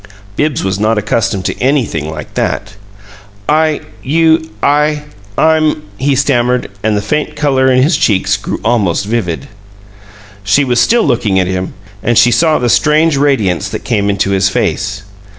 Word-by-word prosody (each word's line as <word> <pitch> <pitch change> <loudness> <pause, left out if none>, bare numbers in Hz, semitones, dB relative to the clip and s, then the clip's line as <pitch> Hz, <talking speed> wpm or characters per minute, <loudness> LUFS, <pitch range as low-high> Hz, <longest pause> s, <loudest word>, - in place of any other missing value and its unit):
Bibbs 150 +2 -1
was 95 +1 -2
not 110 +1 +1
accustomed 105 -1 -1
to - - -3
anything 120 - 0
like 75 -1 -8
that. 100 +1 -2 0.7
"I 155 0 +1 0.2
you 160 +2 +2
I 150 +1 +2 0.3
I'm 155 -1 +2
" 100 - -25
he 140 - +3
stammered, 125 -4 +1
and 105 0 0
the 100 - -2
faint 150 +7 -2
color 135 -3 +2
in 130 0 +3
his 155 +4 +2
cheeks 100 -7 +1
grew 105 - -5
almost 100 -6 +1
vivid. 110 - -2 1.0
She 105 +8 +3
was 125 -2 +1
still 235 0 +3
looking 115 -8 +1
at 90 - +1
him, 95 0 -3 0.3
and 120 +1 +1
she 120 +1 +5
saw 155 +6 +3
the 125 - -1
strange 150 +5 +3
radiance 135 -11 +1
that - - -6
came 100 -3 0
into 100 0 0
his 95 0 +2
face. - - -2
120 Hz, 165 wpm, -13 LUFS, 100-150 Hz, 1.0 s, she